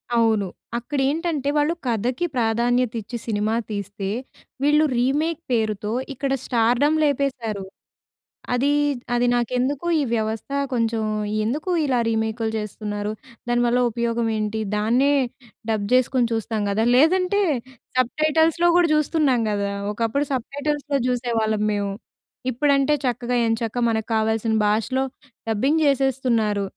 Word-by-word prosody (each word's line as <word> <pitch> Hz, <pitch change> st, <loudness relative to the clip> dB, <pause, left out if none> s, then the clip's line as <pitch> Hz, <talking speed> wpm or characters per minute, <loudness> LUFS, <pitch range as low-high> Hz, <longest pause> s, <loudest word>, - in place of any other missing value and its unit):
అవును. 220 Hz, -4 st, +2 dB, 0.3 s
అక్కడేంటంటే, 285 Hz, +3 st, -1 dB
వాళ్ళు 295 Hz, +3 st, +2 dB
కథకి 245 Hz, -, 0 dB
ప్రాధాన్యత 240 Hz, +1 st, +1 dB
ఇచ్చి 235 Hz, +4 st, -6 dB
సినిమా 215 Hz, +1 st, 0 dB, 0.2 s
తీస్తే, 200 Hz, -1 st, -4 dB, 0.5 s
వీళ్ళు 300 Hz, +2 st, +4 dB
రీమేక్ 300 Hz, +6 st, 0 dB
పేరుతో, 215 Hz, -2 st, 0 dB, 0.2 s
ఇక్కడ 270 Hz, +1 st, -2 dB
స్టార్‌డమ్ 245 Hz, +6 st, +2 dB
లేపేసారు. 255 Hz, -8 st, -1 dB, 0.9 s
అది, 275 Hz, +4 st, +2 dB, 0.4 s
అది 245 Hz, +1 st, +2 dB
నాకెందుకో, 255 Hz, +6 st, -1 dB
ఈ -, -, +1 dB
వ్యవస్థ 220 Hz, +3 st, -3 dB, 0.2 s
కొంచెం, 225 Hz, -2 st, 0 dB, 0.4 s
ఎందుకు 300 Hz, +10 st, -2 dB
ఇలా 255 Hz, -3 st, +1 dB
రీమేక్‌లు 220 Hz, 0 st, -1 dB
చేస్తున్నారు 210 Hz, 0 st, -4 dB, 0.4 s
దానివల్ల 240 Hz, 0 st, +2 dB
ఉపయోగం 235 Hz, 0 st, -1 dB
ఏంటి, 215 Hz, +1 st, -2 dB, 0.2 s
దాన్నే 245 Hz, +7 st, +3 dB, 0.6 s
డబ్ 210 Hz, -2 st, -1 dB
జేసుకొని 255 Hz, -1 st, +3 dB
చూస్తాం 225 Hz, -1 st, -2 dB
గదా. 220 Hz, +3 st, +1 dB
లేదంటే, 365 Hz, +6 st, +3 dB, 0.6 s
సబ్‌టైటల్స్‌లో 310 Hz, +6 st, +2 dB
గూడా 350 Hz, -2 st, +4 dB
చూస్తున్నాం 295 Hz, -6 st, +2 dB
గదా, 200 Hz, -1 st, -1 dB, 0.2 s
ఒకప్పుడు 230 Hz, +6 st, -1 dB
సబ్‌టైటల్స్‌లో 285 Hz, +2 st, -2 dB
జూసేవాళ్ళం 225 Hz, -4 st, 0 dB
మేము. 200 Hz, -1 st, -1 dB, 0.6 s
ఇప్పుడంటే 280 Hz, +2 st, +2 dB
చక్కగా, 245 Hz, 0 st, -1 dB
ఎంచక్కా 225 Hz, +1 st, -1 dB
మనకు 220 Hz, -1 st, -1 dB
కావాల్సిన 220 Hz, 0 st, +1 dB
భాషలో 225 Hz, +5 st, +1 dB, 0.5 s
డబ్బింగ్ 270 Hz, +9 st, +2 dB
జేసేస్తున్నారు 250 Hz, -7 st, +1 dB
240 Hz, 110 wpm, -23 LUFS, 220-280 Hz, 0.9 s, వీళ్ళు